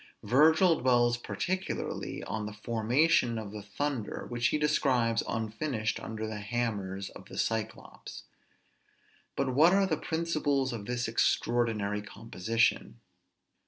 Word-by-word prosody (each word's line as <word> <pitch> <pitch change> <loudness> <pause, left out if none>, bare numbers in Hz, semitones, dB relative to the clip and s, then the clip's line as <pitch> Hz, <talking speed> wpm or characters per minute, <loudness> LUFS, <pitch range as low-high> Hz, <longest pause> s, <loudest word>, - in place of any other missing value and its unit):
Virgil 160 - +5
dwells 120 -1 +3
particularly 185 +10 -3
on 105 +2 -4
the 105 - -7
formation 120 +4 +2
of 110 -3 -6
the 105 0 -7
thunder 115 +2 -3
which 120 0 0
he 150 - +1
describes 130 -6 +2
unfinished 110 +1 -2
under 110 -1 -5
the 110 -1 -5
hammers 105 -3 -3
of - - -12
the - - -11
Cyclops. 110 -1 -4 1.1
But 135 -2 0
what 160 +7 +6
are 195 0 +4
the 160 -5 0
principles 155 -5 -1
of 105 -3 -6
this 125 -1 -1
extraordinary 115 -3 +1
composition? 115 - -1
120 Hz, 125 wpm, -30 LUFS, 110-145 Hz, 1.1 s, what